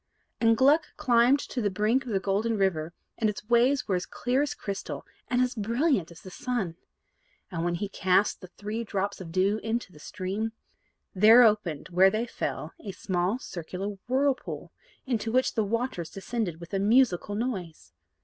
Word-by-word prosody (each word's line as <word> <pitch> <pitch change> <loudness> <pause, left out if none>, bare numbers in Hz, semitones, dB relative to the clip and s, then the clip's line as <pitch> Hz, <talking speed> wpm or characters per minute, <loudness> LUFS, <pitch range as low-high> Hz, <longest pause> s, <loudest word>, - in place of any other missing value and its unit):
And 225 -1 +4
Gluck 295 +5 +3
climbed 245 -1 +4
to 250 - -4
the 205 - +1
brink 215 +7 +1
of - - -4
the 195 - +1
Golden 205 +4 0
River, 170 -5 0 0.3
and 220 - +2
its 210 0 -6
waves 245 +4 +3
were 200 - 0
as 180 -1 -1
clear 250 +3 0
as 290 -1 -1
crystal, 200 -1 -5 0.2
and 250 0 +2
as 250 - -1
brilliant 230 - +1
as 170 - -13
the 185 - -11
sun. 210 -7 -3 0.8
And, 165 -2 -2
when 175 0 0
he 205 +4 -3
cast 190 +1 +1
the 185 - -9
three 210 +5 -5
drops 200 -2 -3
of 165 -3 -8
dew 195 +4 +2
into 225 -2 -2
the 150 - -15
stream, 205 +6 -4 0.6
there 220 +5 +8
opened 210 -9 +1
where 185 +2 +5
they 215 +4 -1
fell 165 -8 -4
a 200 -3 -7
small 185 +3 -1
circular 180 -3 -5 0.2
whirlpool, 265 +1 -1 0.3
into 230 -4 -1
which 255 +2 +2
the 220 - +1
waters 220 -5 -2
descended 195 -4 -3
with 170 +3 -11
a 195 - +1
musical 205 -2 +3
noise. 195 - -4
210 Hz, 180 wpm, -28 LUFS, 185-240 Hz, 0.8 s, there